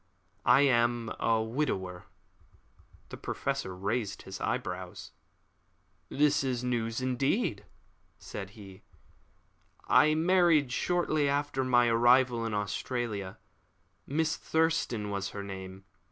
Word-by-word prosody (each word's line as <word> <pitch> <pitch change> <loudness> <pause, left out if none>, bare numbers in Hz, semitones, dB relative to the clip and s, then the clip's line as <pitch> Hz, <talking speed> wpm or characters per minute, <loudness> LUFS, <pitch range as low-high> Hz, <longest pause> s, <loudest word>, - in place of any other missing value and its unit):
I - - +7
am 120 -4 +2
a 115 -1 +2
widower." 100 -8 -3 1.0
The - - -8
Professor 95 -1 -3
raised 100 +3 -2
his 95 0 -8
eyebrows. 90 0 -4 1.0
"This 145 0 +2
is 125 -2 -2
news 115 -1 -1
indeed," 130 - 0 0.5
said 95 -2 -7
he. 95 -3 -12 1.1
"I 155 +1 +5
married 165 -5 +3
shortly 155 -1 +1
after 140 -1 0
my 120 -1 +4
arrival 120 0 +4
in 110 - -3
Australia. 105 -1 -3 0.7
Miss 155 +2 0
Thurston 160 -10 0
was 100 0 -2
her 100 - -4
name. 95 -1 -8
120 Hz, 105 wpm, -30 LUFS, 100-140 Hz, 1.1 s, I